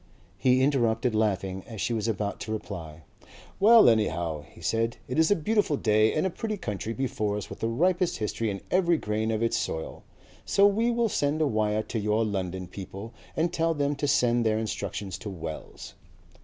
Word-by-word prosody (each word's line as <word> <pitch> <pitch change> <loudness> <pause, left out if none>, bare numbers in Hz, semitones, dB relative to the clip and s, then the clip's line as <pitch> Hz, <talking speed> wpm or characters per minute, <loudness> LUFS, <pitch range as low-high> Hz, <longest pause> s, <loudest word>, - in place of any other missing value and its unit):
He 130 0 +4
interrupted 125 -3 +2
laughing 95 -3 0
as 110 -3 -8
she 120 - 0
was 110 -1 -1
about 105 -2 -2
to 110 - -5
reply. 85 -7 -6 0.6
"Well, 225 +2 +8
anyhow," 85 -8 +1
he - - -16
said, 115 +7 0
"it 125 +5 -1
is 160 - +4
a 205 - +5
beautiful 205 -3 +1
day 110 -1 +3
and 155 - +1
a 190 - 0
pretty 215 +3 -3
country 105 - -4
before 110 -5 -1
us 105 - -7
with - - -8
the 115 - -1
ripest 175 +9 +1
history 110 +1 -2
in 100 -1 -4
every 175 -2 +3
grain 110 -3 -2
of 110 0 0
its 115 - +1
soil. 80 - -4 0.4
So 200 - +4
we'll 230 +3 +2
send 145 -6 0
a 155 - +3
wire 110 -3 +1
to 115 - -3
your 105 +2 +1
London 95 -3 -3
people 95 +4 -8 0.2
and 165 +2 0
tell 165 -1 +1
them 145 0 0
to 145 - -1
send 120 -3 +3
their 110 -1 +2
instructions 100 -3 -4
to 105 - -6
Wells." 80 -4 -7
115 Hz, 190 wpm, -27 LUFS, 105-150 Hz, 0.6 s, Well